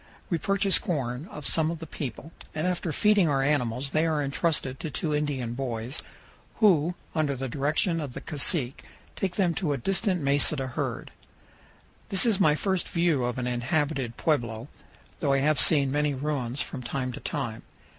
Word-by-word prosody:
We 170 - +1
purchase 195 +3 +3
corn 140 - -3
of 150 - -8
some 160 -1 +3
of 170 - -3
the 165 - -8
people, 145 0 -6 0.2
and 155 +2 -1
after 180 -2 -1
feeding 205 +1 +4
our 135 -2 +2
animals 135 -2 0
they 155 +2 +2
are 155 -2 +1
intrusted 140 -2 -1
to 160 - -4
two 150 +2 -2
Indian 140 -5 -1
boys, 120 0 -4 0.5
who, 175 -5 +4 0.2
under 150 -3 +1
the 135 +1 -3
direction 155 - 0
of 140 -4 -5
the - - -6
cacique, 140 -3 0 0.3
take 190 -2 -2
them 180 -4 +2
to 165 -4 -1
a - - -1
distant 190 - 0
mesa 140 +1 +3
to 135 -2 -2
herd. 130 - -4 1.0
This 195 +1 +3
is 220 -4 +3
my 155 -6 +5
first 190 +2 -1
view 170 -6 +2
of 120 0 -2
an 125 - -2
inhabited 125 0 -1
pueblo, 120 -5 -1 0.5
though 140 -3 +2
I - - +4
have 150 -1 +2
seen 140 0 +6
many 145 0 +1
ruins 135 -2 -1
from 130 - -7
time 130 +1 -3
to - - -7
time. - - -4
150 Hz, 180 wpm, -27 LUFS, 130-165 Hz, 1.0 s, seen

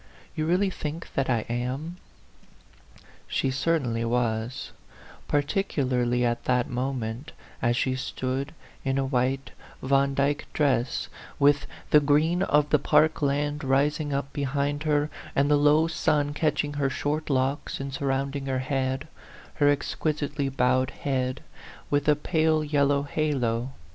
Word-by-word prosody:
You 155 0 -1
really 190 +3 +2
think 155 -1 -6
that 135 -1 0
I 115 -4 +1
am 130 +8 -3 0.7
?" - - -31 0.6
She 135 - 0
certainly 130 -5 0
was, 115 0 -1 0.6
particularly 130 -6 +1
at 120 0 -1
that 125 -1 +2
mo 130 +2 -1
ment, 120 +2 -5 0.3
as 120 +1 +2
she 130 - +1
stood 130 +2 -3 0.3
in 135 0 0
a 135 - +1
white 130 0 0 0.3
Vandyck 140 +2 +1
dress, 135 -4 +1 0.3
with 145 0 +3 0.2
the 150 - +8
green 150 +5 +2
of 150 -5 +2
the 150 - +5
park 155 +2 +3
land 145 +1 0
rising 145 +3 +1
up 140 0 -2
be 145 - -3
hind 140 +1 -1
her, 145 0 +2 0.2
and 140 +2 +3
the - - +6
low 150 +2 +4
sun 150 -3 +1
catching 150 -1 0
her 135 - +2
short 150 +3 -2
locks 135 +1 0
and 135 0 -5
surrounding 135 0 -2
her 130 -1 0
head, 130 +2 -1 0.5
her 145 -1 +4
exquis 145 +1 -1
itely 140 -1 -2
bowed 130 -1 +2
head, 130 -1 -2 0.5
with 145 0 +1
a 150 - +6
pale 155 +1 +1
yellow 140 -1 +2
halo. 135 -5 -1
140 Hz, 145 wpm, -26 LUFS, 130-150 Hz, 0.7 s, the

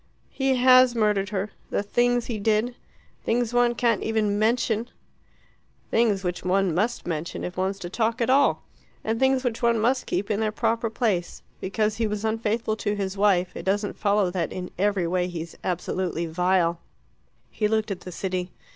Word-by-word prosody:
"He 270 -1 +1
has 255 -1 +6
murdered 210 -3 +1
her. 200 0 -3 0.2
The - - -1
things 240 +3 +1
he 225 -3 -4
did 220 +3 +1 0.5
things 235 0 0
one 245 0 +3
can't 235 -2 +1
even 215 -2 0
mention 230 +1 +1 0.5
" - - -37
"Things 215 -4 +2
which 180 -1 -3
one 185 -1 +2
must 210 +8 -1
mention 165 -1 -4
if 180 - -5
one's 190 +1 -1
to 180 - -6
talk 225 +5 -1
at 235 - +1
all. 275 +2 +3 0.4
And 225 +1 -1
things 265 0 +3
which 240 -3 -2
one 235 -1 +3
must 245 +4 +1
keep 200 +4 -1
in 205 - 0
their 215 -1 0
proper 230 +1 0
place. 215 -6 -1 0.2
Because 210 +2 -1
he 225 -1 +1
was 210 +1 -3
unfaithful 220 0 0
to 210 -1 -1
his 195 -1 -3
wife, 195 -3 +2
it - - -5
doesn't 205 +2 -1
follow 200 -3 +1
that 175 -3 -2
in 180 -1 -6
every 200 -1 +1
way 180 +1 0
he's 170 -2 -6
absolutely 180 -1 -2
vile." 170 0 +1 0.7
He 210 - 0
looked 220 0 0
at 190 - -3
the 180 - -9
city. 185 0 -3
210 Hz, 180 wpm, -25 LUFS, 185-230 Hz, 0.7 s, has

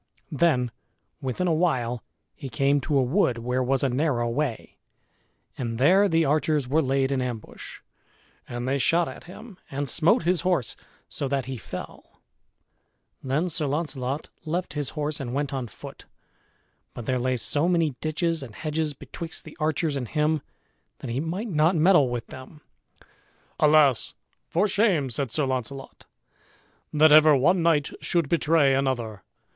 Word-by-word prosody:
Then 130 -6 +2 0.5
within 135 +7 -2
a 170 - +2
while 125 -8 0 0.3
he 135 - -8
came 140 +4 +1
to 145 +2 0
a 135 - +4
wood 130 - +1
where 125 +2 -1
was 130 +1 +1
a 135 - +2
narrow 125 -2 0
way; 125 0 -3 0.8
and 115 -3 -3
there 190 - +5
the 165 -1 +3
archers 150 -1 +1
were 150 +5 +2
laid 135 -1 +1
in 135 -2 0
ambush. 120 -3 -7 0.7
And 120 +1 -4
they 140 +1 0
shot 170 +5 +2
at - - -9
him 195 +2 -12
and 140 +1 -3
smote 160 +6 +3
his 175 -1 +1
horse 175 -10 0 0.3
so 140 - -4
that 135 -2 -1
he 130 0 -5
fell. 115 - -9 1.0
Then 140 +6 0
Sir 160 -3 -2
Launcelot 145 -2 -3
left 175 +3 -3
his 145 -3 -2
horse 150 0 -2
and 125 -2 -4
went 145 -1 -2
on 130 -3 -3
foot, 105 - -12 0.9
but 120 - -7
there 130 +1 0
lay 130 +1 0
so 145 +7 +1
many 165 -4 +2
ditches 165 +1 -1
and 120 -6 -9
hedges 155 -1 -2
betwixt 165 +5 -7
the 155 - -11
archers 155 -1 0
and 130 -3 -3
him 150 +3 0 0.6
that 115 - -6
he 125 - -1
might 175 +9 -3
not 160 +1 +3
meddle 160 -4 +5
with 120 -1 -4
them. 130 +4 -12 1.0
"Alas! 150 -4 +4 0.3
for 190 +6 +2
shame," 190 - +2
said 135 +2 -2
Sir 150 +3 0
Launcelot, 130 +1 -5 0.8
"that 155 0 +5
ever 155 0 +8
one 175 +7 +3
knight 160 -4 +2
should 170 -5 0
betray 160 -4 +3
another! 120 -6 -1
145 Hz, 160 wpm, -25 LUFS, 130-160 Hz, 1.0 s, ever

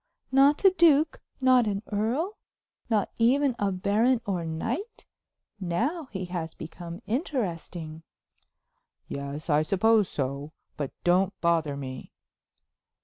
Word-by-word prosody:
"Not 280 +6 +4
a 385 - +9
duke; 320 -4 +4 0.2
not 255 -3 +5
an 200 0 -2
earl; 245 - 0 0.5
not 215 -4 +1
even 260 +3 +3
a 200 -1 +1
baron 210 +7 +2
or 185 -4 -1
knight? 235 - -4 0.5
Now 250 - -1
he 190 -2 -4
has 175 -2 -5
become 170 +4 -8
interesting." 175 - -3 1.1
"Yes, 140 +3 -5
I 150 -2 +3
suppose 205 +4 +3
so; 140 +2 -3 0.2
but 145 -3 -4
don't 185 +2 +2
bother 165 -4 +1
me." 130 -2 -7
195 Hz, 115 wpm, -27 LUFS, 165-255 Hz, 1.1 s, a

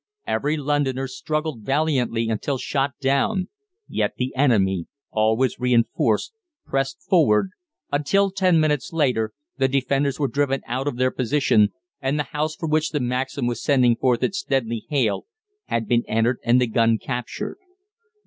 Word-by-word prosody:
Every 150 +2 0
Londoner 140 -2 0
struggled 155 0 -3
valiantly 130 -3 0
until 115 +5 -1
shot 135 +1 -1
down; 140 +8 +1 0.4
yet - - -1
the 130 +1 -3
enemy, 95 -10 +2 0.2
always 110 +4 +1
reinforced, 120 - +1 0.3
pressed 135 0 -2
forward, 165 - +3 0.4
until 195 +8 +2
ten 185 -3 +3
minutes 150 -4 0
later, 125 -9 +1 0.3
the 135 - +4
defenders 135 +1 0
were 140 - +2
driven 135 -1 0
out 130 +4 -3
of 140 - -2
their 130 0 +2
position, 120 -5 +2 0.3
and 135 +2 0
the 150 - +1
house 155 +1 -1
from 160 -2 -4
which 155 0 +2
the 150 - -1
Maxim 130 +1 -2
was 120 -1 -2
sending 125 -5 +3
forth 125 -1 +1
its 195 - 0
deadly 115 -5 -2
hail 130 - 0 0.4
had 115 -2 -2
been 120 -1 +2
entered 115 +3 +1
and 120 +2 +4
the 125 - +3
gun 115 0 +2
captured. 125 - -5
135 Hz, 150 wpm, -23 LUFS, 120-145 Hz, 0.4 s, the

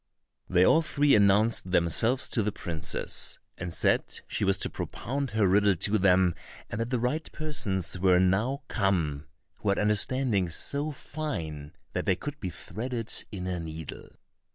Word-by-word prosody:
They 90 0 +4
all 160 - +5
three 145 -2 +2
announced 105 0 +4
themselves 105 +9 +2
to 115 - +2
the 105 0 -1
princess, 85 -6 -2 0.2
and 90 -1 -5
said - - +1
she - - -3
was 95 -1 +3
to - - 0
propound 140 +2 -4
her 110 -2 +2
riddle 100 +1 +4
to 105 +5 0
them, 90 -2 +4 0.4
and 105 - -3
that 115 - -2
the 125 - 0
right 145 +7 -2
persons 110 - -1
were 90 -1 +4
now 105 +10 +1
come, 80 -7 -1 0.3
who 105 - -1
had 100 - +2
understandings 105 -3 +2
so 145 +2 0
fine 85 - -5 0.2
that - - -3
they 95 - +3
could 145 +8 -7
be 95 - -4
threaded 115 +6 -5 0.2
in 95 -4 -5
a 90 -1 -2
needle. 80 -2 -8
100 Hz, 160 wpm, -28 LUFS, 90-125 Hz, 0.4 s, all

